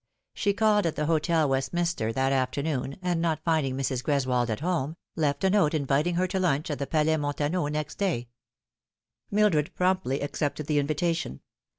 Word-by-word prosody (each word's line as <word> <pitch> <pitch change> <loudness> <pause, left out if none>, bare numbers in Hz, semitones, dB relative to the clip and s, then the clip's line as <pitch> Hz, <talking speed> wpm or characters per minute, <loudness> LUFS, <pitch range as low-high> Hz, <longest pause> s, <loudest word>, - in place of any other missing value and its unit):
She 200 -1 +1
called 210 -2 +3
at 160 - -2
the 150 - -1
Hotel 160 0 +2
Westminster 135 -1 0
that 135 +2 +1
afternoon, 135 +1 -1
and 175 -2 0
not 165 -2 0
finding 155 -6 +1
Mrs. 130 -2 -1
Greswold 130 -4 +1
at 110 +4 -2
home, 165 -3 -1 0.2
left 145 -2 0
a 190 - +4
note 185 -7 +3
inviting 150 +4 +1
her 180 +2 +2
to 185 +1 -2
lunch 155 -4 0
at 145 - -3
the 140 - -2
Palais 160 0 +2
Montafio 145 +2 -1
next 150 0 -4
day. 170 -12 0 1.0
Mildred 200 -8 +2
promptly 180 -8 +1
accepted 145 +1 -2
the 150 0 +2
invitation. 155 - -1
150 Hz, 170 wpm, -27 LUFS, 140-175 Hz, 1.0 s, a